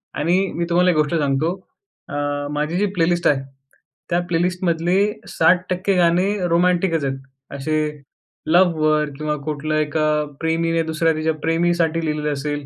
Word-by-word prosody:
आणि 180 +5 +1
मी 170 - -1
तुम्हाला 180 +1 +4
एक 165 - -1
गोष्ट 150 +2 +1
सांगतो 145 +1 +1 0.6
अ, 145 - -5 0.4
माझी 150 +3 -2
जी 205 - +2
प्लेलिस्ट 175 0 +2
आहे, 140 -2 +2 0.7
त्या 175 0 +2
प्लेलिस्टमधले 175 0 0 0.3
60% 185 +3 +2
गाणे 175 +1 +3 0.2
रोमॅटिकच 170 -2 +2
आहेत. 135 0 -2 0.4
असे 155 +3 -1 0.7
लव्हवर 155 -3 +3
किंवा 150 0 -2
कुठलं 155 0 -2
एका 155 0 0 0.4
प्रेमीने 165 0 +1
दुसऱ्या 160 0 +1
तिच्या 155 +1 0
प्रेमीसाठी 165 0 +1
लिहिलेलं 150 -1 -1
असेल, 145 +1 -4
165 Hz, 135 wpm, -21 LUFS, 155-175 Hz, 0.7 s, तुम्हाला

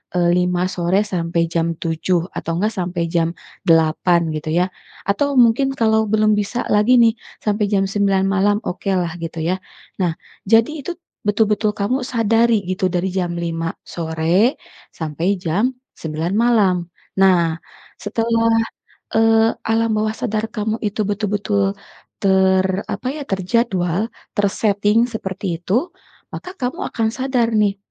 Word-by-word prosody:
eee, 175 -1 +3
5 180 0 +1
sore 180 +1 +1
sampai 170 -4 -1
jam 165 0 0
7, 170 +1 0
atau 165 - -3
enggak 215 +3 0
sampai 175 -2 -2
jam 165 0 +2 0.3
8 165 0 +3 0.2
gitu 155 0 -4
ya. 180 - +2 0.4
Atau 280 +9 +1
mungkin 245 +3 +4
kalau 220 -1 +3
belum 215 -1 +3
bisa 210 +4 -2 0.2
lagi 235 +4 +5
nih, 230 -1 +5 0.3
sampai 210 0 +1
jam 195 -2 +3
9 195 -1 +2
malam, 200 +1 +2
okelah 180 -2 -1
gitu 165 0 -5
ya. 185 - +2 0.4
Nah, 175 -3 +1 0.3
jadi 225 +6 +4
itu 355 - -4 0.3
betul-betul 210 0 +2
kamu 245 +5 -1
sadari 230 -1 +2
gitu 185 0 -1
dari 180 +1 0
jam 180 -2 -2
5 165 -1 -3
sore 170 - 0 0.3
sampai 160 +1 -3
jam 200 +9 0 0.2
9 160 +3 -3
malam. 225 -5 +4 0.4
Nah 175 -4 +4 0.4
setelah 230 +1 +1 0.6
eee, 225 0 +4 0.2
alam 225 0 +2
bawah 215 0 0
sadar 220 0 -2
kamu 220 0 -2
itu 210 0 -2
betul-betul 205 -1 0 0.5
ter 190 -1 +4 0.2
apa - - -4
ya? 300 0 -6
Terjadwal, 190 -1 0 0.3
terseting 205 +1 +2
seperti 190 -5 -4
itu, 235 - 0 0.4
maka 365 - -7
kamu 250 -4 -3
akan 225 -1 0
sadar 255 -2 0
nih, 210 -2 +2
200 Hz, 135 wpm, -20 LUFS, 175-225 Hz, 0.6 s, lagi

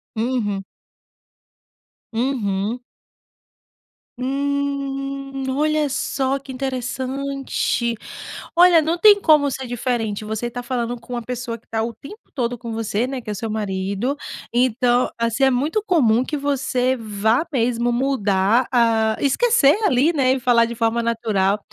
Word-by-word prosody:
Uhum. 220 -4 -1 1.5
Uhum. 225 -3 -1 1.4
Hum, 275 0 -2
olha 305 0 +2
só 270 0 -1
que 275 -1 -10
interessante! 260 -1 -2 0.6
Olha, 345 -2 +7
não 325 +3 0
tem 410 +2 +7
como 300 -5 +4
ser 260 -1 -5
diferente. 235 -4 -2
Você 220 +3 -3
tá 245 +1 -6
falando 240 -1 -2
com 245 +2 -10
uma 240 - -2
pessoa 240 0 -5
que 230 - -30
tá 225 0 -1
o 230 0 -3
tempo 410 - -13
todo 245 -2 -2
com 235 -1 -7
você, 225 +1 -1
né. 265 -1 -4
Que 215 - -9
é - - -1
o - - -6
seu 225 +2 -4
marido. 200 +4 -2 0.4
Então 245 0 +2
assim, 230 +3 0
é 265 - +6
muito 305 - 0
comum 255 - +3
que 300 +2 -3
você 265 -2 0
vá 220 +5 0
mesmo 240 -1 +1
mudar, 235 -3 +2
hã, 225 -2 +3
esquecer 310 - +4
ali, 305 -1 +3
né. 265 -4 +2
E 265 - -1
falar 240 -1 +4
de 235 - -5
forma 230 0 0
natural. 215 -4 +1
250 Hz, 140 wpm, -21 LUFS, 230-275 Hz, 1.5 s, Olha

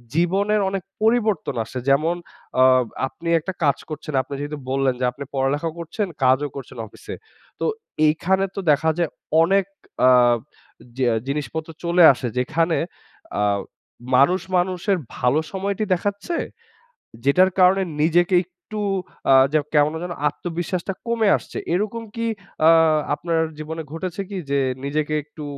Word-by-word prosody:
জীবনের 200 +5 +2
অনেক 195 -1 -3 0.2
পরিবর্তন 220 - +1
আসে, 125 +3 -6
যেমন 155 +5 +3 0.5
আ - - +8 0.4
আপনি 170 +5 -7
একটা 190 +4 -5
কাজ 140 -2 +3
করছেন, 155 0 -6
আপনি 130 +2 -9
যেহেতু 145 +1 -4
বললেন 135 -1 +2
যে 125 - +1
আপনি 140 +3 -8
পড়ালেখাও 145 +4 0
করছেন, 170 +5 -3 0.2
কাজও 130 +3 +3
করছেন 135 -2 -9
অফিসে। - - -9 0.4
তো - - -1 0.4
এইখানে 190 +5 +2
তো - - -3
দেখা 155 +2 +2
যায় 170 -3 +1 0.3
অনেক 195 +2 +3 0.4
আ - - +8 0.9
জিয়া 125 -3 +2
জিনিসপত্র 150 +3 -3
চলে 170 +1 +4
আসে, 125 - -4
যেখানে 165 +6 +1 0.6
আ - - +2 0.7
মানুষ 160 +9 +4 0.2
মানুষের 185 +2 0 0.2
ভালো 125 +5 +2
সময়টি 200 +2 -2
দেখাচ্ছে, 205 - -2 0.9
যেটার 180 +7 +5
কারণে 185 +1 +5 0.2
নিজেকে 175 +3 +3
একটু 190 +4 -9 0.5
আ - - +8 0.2
যে 155 - +4 0.2
কেমন 150 +1 +4
যেন 180 0 -4 0.2
আত্মবিশ্বাসটা 175 +4 -4
কমে 230 -2 +2
আসছে। - - -8 0.2
এরকম 215 +4 -1
কি 230 0 -2 0.4
আ - - +9 0.4
আপনার 165 +1 -1 0.2
জীবনে 160 +1 -5
ঘটেছে 185 +3 -4
কি? 200 - -5
যে 140 - +2 0.3
নিজেকে 150 +2 -1
একটু 150 0 -10
165 Hz, 140 wpm, -22 LUFS, 145-190 Hz, 0.9 s, আ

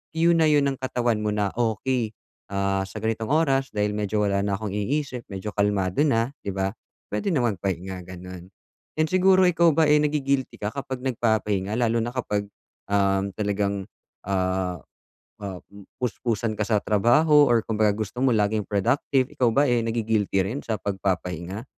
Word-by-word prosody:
que 165 - 0
na 165 -1 +4
'yon 145 -2 +3
ng - - -9
katawan 120 -4 0
mo 105 - 0
na 100 -2 0
okey, 115 0 0 0.4
ah, 100 0 0
sa 105 - -9
ganitong 110 0 -1
oras 135 -4 +2
dahil 105 0 +1
medyo 105 0 0
wala 100 -1 +1
na 100 -1 0
akong 105 -1 -5
iniisip 125 +4 -2
medyo 95 +2 -5
kalmado 100 0 0
na, 120 -3 +1
di 100 - -1
ba, 95 0 0 0.4
puwede 105 - -1
na 140 - +2
magpahinga 95 -3 -3
gano'n. 90 0 -9 0.5
'Yon 155 0 +2
siguro, 185 0 +5
ikaw 170 -1 +4
ba, 160 0 +4
eh, 150 - +6
nagi-guilty 140 -3 0
ka 105 +1 -2
kapag 135 -2 -5
nagpapahinga? 110 -5 0
Lalo 115 -1 +2
na 120 - -3
kapag, 105 -5 -2 0.4
um, 100 0 +2
talagang, 100 -1 -1 0.4
ah, 95 -2 -1 0.6
ah, 95 -3 -5
um, 100 -1 -13 0.2
puspusan 115 -2 -1
ka 105 - 0
sa 105 -3 +2
trabaho 145 +8 +4
or 120 -1 +4
kumbaga 110 -2 +2
gusto 110 +2 -5
mo 130 -2 +3
laging 105 0 +1
productive, 125 +5 +1
ikaw 125 - +1
ba 140 - +4
eh 120 -1 +3
nagi-guilty 110 -4 0
rin 110 +9 -3
sa 110 - -1
pagpapahinga? 95 0 -3
110 Hz, 170 wpm, -25 LUFS, 100-130 Hz, 0.6 s, eh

